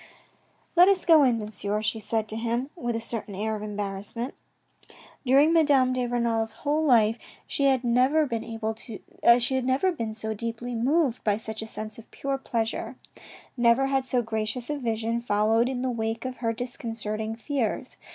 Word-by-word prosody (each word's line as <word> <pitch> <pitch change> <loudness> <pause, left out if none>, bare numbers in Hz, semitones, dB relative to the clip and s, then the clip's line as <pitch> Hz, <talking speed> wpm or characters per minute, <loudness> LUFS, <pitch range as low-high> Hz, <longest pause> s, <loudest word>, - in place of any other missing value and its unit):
" - - -38
Let 355 +1 +8
us 390 -2 +2
go 325 -3 +7
in, 250 -4 +4
Monsieur," 210 -1 -3
she 220 +1 -1
said 220 +1 -1
to 215 - -5
him 235 +4 -2
with 240 -8 -3
a - - -1
certain 225 -3 -5
air 220 +2 -1
of 210 - -6
embarrassment. 210 +3 -4 0.9
During 280 +5 +5
Madame 280 -6 +4
de 250 -1 -1
Renal's 230 -2 0
whole 300 +2 +2
life 230 -5 +4 0.3
she 280 - -1
had 265 -2 +3
never 255 +6 +3
been 230 -5 -3 1.7
so 220 0 -3
deeply 230 +2 -4
moved 260 +2 +1
by 210 -1 +2
such 220 0 -6
a 220 - -6
sense 215 0 -7
of 230 - -14
pure 275 0 -3
pleasure. 230 -3 -2 0.6
Never 240 +1 +4
had 270 -1 +1
so 250 -1 0
gracious 220 +4 -3
a 295 - -2
vision 230 -1 -1
followed 225 +2 +2
in 255 -1 -3
the 260 - 0
wake 225 0 -3
of 255 -1 -4
her 230 -1 0
discon 240 0 -5
certing 215 +1 -3
fears. 250 -4 -2
235 Hz, 170 wpm, -26 LUFS, 220-260 Hz, 1.7 s, Let